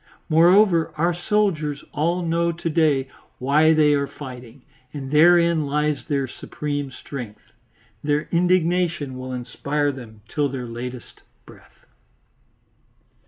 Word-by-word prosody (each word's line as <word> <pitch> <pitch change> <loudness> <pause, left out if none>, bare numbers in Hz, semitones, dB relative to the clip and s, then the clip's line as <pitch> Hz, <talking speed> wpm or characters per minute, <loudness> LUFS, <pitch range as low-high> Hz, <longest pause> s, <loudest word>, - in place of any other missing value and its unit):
Moreover 170 +1 +4
our 170 +3 +2
soldiers 175 -6 -1
all 170 +4 0
know 170 +1 +1
to 170 0 -4
day 150 -5 +2 0.3
why 150 +5 +3
they 155 -2 +4
are 140 -1 0
fighting, 130 -3 -11 0.3
and 135 -2 -7
therein 170 0 +4
lies 150 0 0
their 140 -4 -1
supreme 145 +2 -5
strength. 125 -4 -9 0.5
Their 145 0 0
indignation 175 -4 +1
will 130 0 -6
inspire 145 +4 -2
them 115 -5 -11
till 145 -2 -1
their 130 -2 -5
latest 120 +1 -8 0.2
breath. - - -19
150 Hz, 120 wpm, -22 LUFS, 135-170 Hz, 0.5 s, Moreover